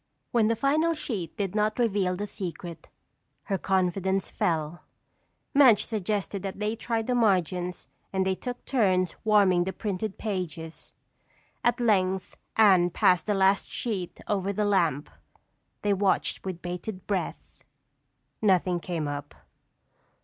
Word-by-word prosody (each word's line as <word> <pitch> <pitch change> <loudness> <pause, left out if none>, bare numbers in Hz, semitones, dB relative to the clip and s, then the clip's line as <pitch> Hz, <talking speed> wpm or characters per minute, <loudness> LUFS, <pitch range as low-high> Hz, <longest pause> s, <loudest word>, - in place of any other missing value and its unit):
When 230 -4 +3
the 230 - +2
final 310 +7 +2
sheet 210 - -5
did 195 -3 -2
not 215 0 +1
reveal 200 -6 +1
the 205 +3 -3
secret, 175 -4 -7 0.5
her 195 -3 -2
confidence 190 0 0
fell. 160 0 -1 0.7
Madge 260 -7 +6
suggested 205 -2 -2
that 195 0 -5
they 210 +2 -1
try 230 0 -2
the 250 - -1
margins 180 -6 +1 0.2
and 190 -1 0
they 190 - +2
took 245 +5 -6
turns 185 - +2
warming 200 -5 +4
the 190 - -2
printed 205 -1 -3
pages. 170 -6 -4 0.7
At 240 0 +2
length 190 -5 +1 0.2
Anne 190 -5 +6
passed 180 +1 +3
the 210 - +2
last 195 0 +3
sheet 195 -7 -4
over 200 -1 0
the 210 +1 0
lamp. 165 -8 +1 0.8
They 205 -1 +3
watched 195 0 +1
with 185 -2 -5
bated 180 +2 -5
breath. 195 -3 -4 0.8
Nothing 185 -4 +3
came 165 -2 -3
up. 145 0 -5
195 Hz, 135 wpm, -27 LUFS, 180-215 Hz, 0.8 s, Madge